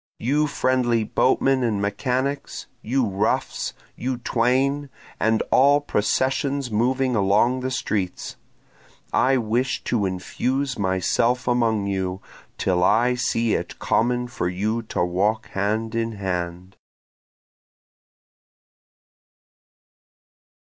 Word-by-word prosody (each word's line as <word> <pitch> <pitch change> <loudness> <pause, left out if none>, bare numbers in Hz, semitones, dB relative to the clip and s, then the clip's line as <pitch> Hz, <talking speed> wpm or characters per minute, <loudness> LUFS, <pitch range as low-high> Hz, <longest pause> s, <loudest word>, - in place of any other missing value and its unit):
You 145 +6 +1
friendly 125 -4 +1
boatmen 130 +4 +2
and 115 -4 0
mechanics! 130 +7 -2 0.2
you 130 +2 +1
roughs! 100 +1 -1 0.2
You 130 0 -3
twain! 130 +4 +1 0.3
and 110 0 +2
all 140 +2 +5
processions 135 +2 0
moving 125 +3 +1
along 105 +5 +3
the 130 0 -2
streets! 100 -7 -3 0.8
I 130 +1 +3
wish 120 +3 -1
to 105 -5 0
infuse 130 +9 -2
myself 100 +6 +1
among 115 -4 +2
you 95 -1 -2 0.4
till 90 -1 +1
I 120 +6 +4
see 115 -2 0
it - - -3
common 125 +1 +1
for 90 -7 -2
you 105 +6 -1
to 90 - 0
walk 100 +5 0
hand 110 +3 -1
in 115 0 -1
hand. 90 -2 -4
115 Hz, 100 wpm, -23 LUFS, 100-130 Hz, 0.8 s, all